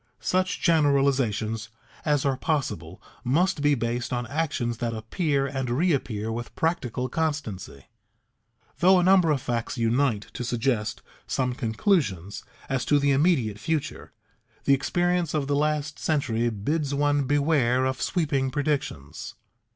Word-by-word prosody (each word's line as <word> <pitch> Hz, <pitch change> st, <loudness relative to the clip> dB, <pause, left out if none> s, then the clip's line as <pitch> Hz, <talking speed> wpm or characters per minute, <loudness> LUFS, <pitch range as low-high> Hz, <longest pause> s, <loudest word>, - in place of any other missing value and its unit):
Such 185 Hz, 0 st, 0 dB
generalizations 135 Hz, -, +2 dB, 0.4 s
as 145 Hz, -3 st, +2 dB
are 135 Hz, -1 st, +2 dB
possible 130 Hz, -, -2 dB, 0.2 s
must 160 Hz, +6 st, +1 dB
be 145 Hz, 0 st, +4 dB
based 120 Hz, 0 st, -2 dB
on 120 Hz, -1 st, -1 dB
actions 135 Hz, -6 st, -2 dB
that 115 Hz, -2 st, -2 dB
appear 140 Hz, +6 st, 0 dB
and 135 Hz, -2 st, -3 dB
reappear 125 Hz, -, 0 dB
with 120 Hz, +1 st, -6 dB
practical 130 Hz, -7 st, -1 dB
constancy. 135 Hz, -, -3 dB, 0.9 s
Though 185 Hz, +2 st, +6 dB
a -, -, +2 dB
number 185 Hz, -2 st, +5 dB
of 140 Hz, -4 st, +1 dB
facts 120 Hz, +1 st, -2 dB
unite 115 Hz, -1 st, +1 dB
to -, -, -4 dB
suggest 120 Hz, -2 st, -1 dB, 0.2 s
some 125 Hz, -1 st, 0 dB
conclusions 110 Hz, -, 0 dB, 0.2 s
as 130 Hz, -2 st, -1 dB
to 145 Hz, -, +4 dB
the 140 Hz, 0 st, +2 dB
immediate 135 Hz, -, +2 dB
future, 155 Hz, +6 st, -3 dB, 0.5 s
the 140 Hz, -, +4 dB
experience 175 Hz, +4 st, +1 dB
of 145 Hz, -2 st, 0 dB
the 140 Hz, +1 st, 0 dB
last 150 Hz, 0 st, -1 dB
century 120 Hz, -7 st, 0 dB
bids 140 Hz, +7 st, -1 dB
one 145 Hz, 0 st, +2 dB
beware 140 Hz, -3 st, +2 dB
of 130 Hz, -1 st, -2 dB
sweeping 140 Hz, -6 st, 0 dB
predictions. 120 Hz, -, -3 dB
135 Hz, 135 wpm, -26 LUFS, 115-150 Hz, 0.9 s, Though